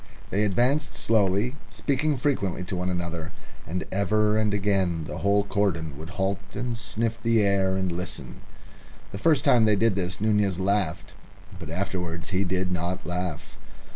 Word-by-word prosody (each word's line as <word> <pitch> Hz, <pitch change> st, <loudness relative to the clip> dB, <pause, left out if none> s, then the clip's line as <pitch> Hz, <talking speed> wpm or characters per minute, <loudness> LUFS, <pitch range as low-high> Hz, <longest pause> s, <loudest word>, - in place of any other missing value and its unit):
They 105 Hz, +2 st, +2 dB
advanced 125 Hz, +9 st, +1 dB
slowly, 110 Hz, +3 st, +2 dB
speaking 145 Hz, +1 st, 0 dB
frequently 120 Hz, -, 0 dB
to 90 Hz, +1 st, -4 dB
one 90 Hz, +1 st, -1 dB
another, 85 Hz, -2 st, -3 dB, 0.4 s
and 90 Hz, +3 st, -2 dB
ever 105 Hz, +2 st, +2 dB
and 110 Hz, -1 st, +2 dB
again 95 Hz, -5 st, +1 dB
the -, -, -6 dB
whole 100 Hz, +1 st, +3 dB
cordon 95 Hz, -7 st, -1 dB
would 80 Hz, +3 st, -8 dB
halt 95 Hz, +1 st, -1 dB, 0.2 s
and 125 Hz, -1 st, -2 dB
sniff 115 Hz, +1 st, -2 dB
the 115 Hz, -2 st, +3 dB
air 95 Hz, -1 st, +2 dB
and 95 Hz, -1 st, 0 dB
listen. 90 Hz, +1 st, -5 dB, 0.7 s
The 100 Hz, -, -6 dB
first 145 Hz, +2 st, +3 dB
time 115 Hz, -3 st, +5 dB
they 105 Hz, -1 st, +5 dB
did 115 Hz, +1 st, +3 dB
this 95 Hz, -1 st, -2 dB
Nunez 105 Hz, -3 st, +2 dB
laughed. 95 Hz, -3 st, 0 dB, 0.5 s
But 80 Hz, -4 st, -7 dB
afterwards 85 Hz, -1 st, -3 dB
he 95 Hz, +1 st, +2 dB
did 95 Hz, 0 st, -1 dB
not 90 Hz, +1 st, -2 dB
laugh. 90 Hz, -2 st, -4 dB
100 Hz, 160 wpm, -26 LUFS, 90-110 Hz, 0.7 s, time